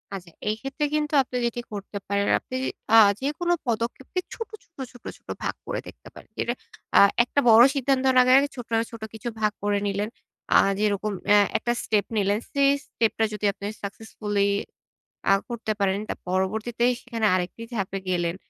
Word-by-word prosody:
আচ্ছা 175 -3 -9 0.2
এই 215 - +1
ক্ষেত্রে 275 +2 -2
কিন্তু 300 0 -1
আপনি 250 -1 -4
যেটি 240 0 -2
করতে 200 0 -6
পারেন, 200 0 0
আপনি 255 - -8 0.4
অ্যা 225 - +9 0.2
যেকোনো 325 +5 0
পদক্ষেপকে 240 +8 -2
ছোট, 455 - -6
ছোট, 335 - -36
ছোট, 245 - -16
ছোট - - -36 0.2
ভাগ - - -1
করে - - -3
দেখতে - - -13
পারেন। - - -14
এটা - - 0 0.4
আ - - +9 0.2
একটা 265 - 0
বড় 225 +1 +9
সিদ্ধান্তর 265 -1 +2
আগে, 255 0 +4
আগে 285 +1 0
ছোট, 245 -2 -8 0.2
ছোট 230 -1 -10
কিছু 220 +2 -5
ভাগ 215 -1 +2
করে 205 0 +1
নিলেন। 200 +2 -1 0.4
অ্যা - - +7 0.2
যেরকম 210 0 0 0.2
আ - - +8 0.2
একটা 240 - -1
স্টেপ 210 -2 +1
নিলেন 205 +1 +2
সেই 280 -1 +4 0.2
স্টেপ 225 -2 0
টা - - +4
যদি 210 0 -3
আপনি 200 - -9 0.2
successfully 205 -1 -2 0.8
অ্যা 195 - +5 0.2
করতে 230 -2 -3
পারেন। 195 0 +1
তো - - 0 0.2
পরবর্তীতে 215 +6 -1 0.2
সেখানে 230 -3 -2
আরেকটি 185 +5 -3
ধাপে 195 -2 -2
গেলেন। 175 -1 0
220 Hz, 175 wpm, -25 LUFS, 200-250 Hz, 0.8 s, অ্যা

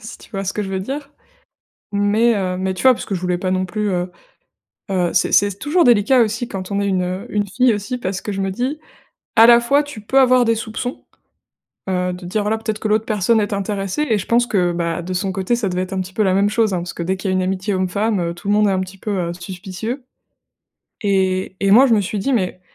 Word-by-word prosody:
si 220 +2 -10
tu - - -17
vois 195 -2 -4
ce 190 - -2
que 210 - -2
je 195 - -5
veux 190 -1 -2
dire? 280 +7 -5 0.8
Mais 205 +3 +2
heu, 185 -2 -1
mais, 190 0 -1
tu - - -6
vois? 260 -1 +7
Parce - - -6
que 200 - -3
je 175 - -5
voulais 180 -1 0
pas 185 0 -2
non 185 0 0
plus, 210 +3 -2
heu, 180 -1 -2 0.8
heu 180 -2 +1
c'est 180 - +2
c'est 205 - +5
s 200 -1 -7
toujours 335 +4 +2
délicat 240 +2 +5
aussi 230 +2 -1
quand 190 -2 -6
on 200 - 0
est 200 - 0
une, 185 -2 +1
heu, 185 +4 -4
une 205 -1 0
fille 245 +4 +2
aussi. 210 +5 -3
Parce 195 -4 -4
que 205 - -4
je 195 - -3
me 195 0 -1
dis: 260 +9 -2 0.6
«À 225 - +9
la 235 0 +7
fois 280 +5 +3
tu 290 -7 -9
peux 260 +6 +1
avoir 255 -1 +5
des 230 -1 +2
soupçons, 225 +3 -5 0.9
heu, 180 -1 0
de 180 - -7
te - - -9
dire 200 +4 -1
voilà, 215 +2 0
peut-être 220 -1 -4
que 215 - -2
l'autre 215 +1 +1
personne 215 +2 +2
est 205 0 -2
intéressée» 200 +7 -2
et 220 - +3
je 190 - -4
pense 240 +1 +2
que 180 -6 +1
bah, 170 -1 -2
de 180 +2 -5
son 190 +1 -1
côté 190 +6 0
ça 225 -4 -1
devait 180 0 -1
être 185 +1 -5
un 190 - -1
petit 185 +1 -8
peu 215 - +1
la 190 - +2
même 200 +2 +3
chose, 215 -2 +1
hein. - - 0
Parce 175 0 -5
que 170 - -4
dès 190 +2 -1
qu'il 190 +1 -3
y - - +1
a - - +1
une 185 - +1
amitié 190 +2 -1
homme 185 0 0
femme, 205 +2 0
heu, 170 0 -2
tout 175 +4 -11
le 205 - +3
monde 210 0 +4
est - - +2
un 190 - +1
petit 185 +1 -6
peu, 210 +2 -5 0.2
heu, - - -3
suspicieux 190 +8 -6 1.0
et 190 -2 0
et 195 - +2
moi 250 +7 +7
je 235 - +4
me 210 - +3
suis 200 +2 -3
dit: 270 +8 -1
«Mais, 185 -6 -1
200 Hz, 280 wpm, -19 LUFS, 185-225 Hz, 1.0 s, À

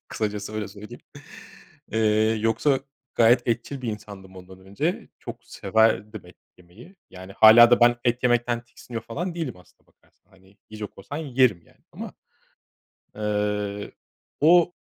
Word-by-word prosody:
Kısacası 105 0 -4
öyle 105 -2 -4
söyleyeyim. 105 +1 -11 0.9
Eee, 110 0 +2
yoksa 130 +5 +1 0.3
gayet 120 +1 +4
etçil 120 +4 -2
bir 120 - -3
insandım 100 -3 -10
ondan 95 0 -13
önce. 100 - -4
Çok - - -10
severdim 110 -1 0
et 90 - -17 0.2
yemeyi. 110 - -17
Yani 95 +1 -11
hâlâ 115 +3 +8
da 120 - +4
ben 120 0 +5
et 120 +1 0
yemekten 120 -1 +1
tiksiniyor 120 -1 -9
falan 170 +10 -5
değilim 165 - -4
aslında 90 - -23
bakarsan. 95 - -34
Hani 95 +1 -23
yiyecek 105 -2 -8
olsam 145 +10 -7
yerim 125 -9 +2
yani - - -27
ama, - - -8 1.0
eee, 105 -1 -2 0.5
o 175 +2 +5
110 Hz, 135 wpm, -24 LUFS, 100-120 Hz, 1.0 s, hâlâ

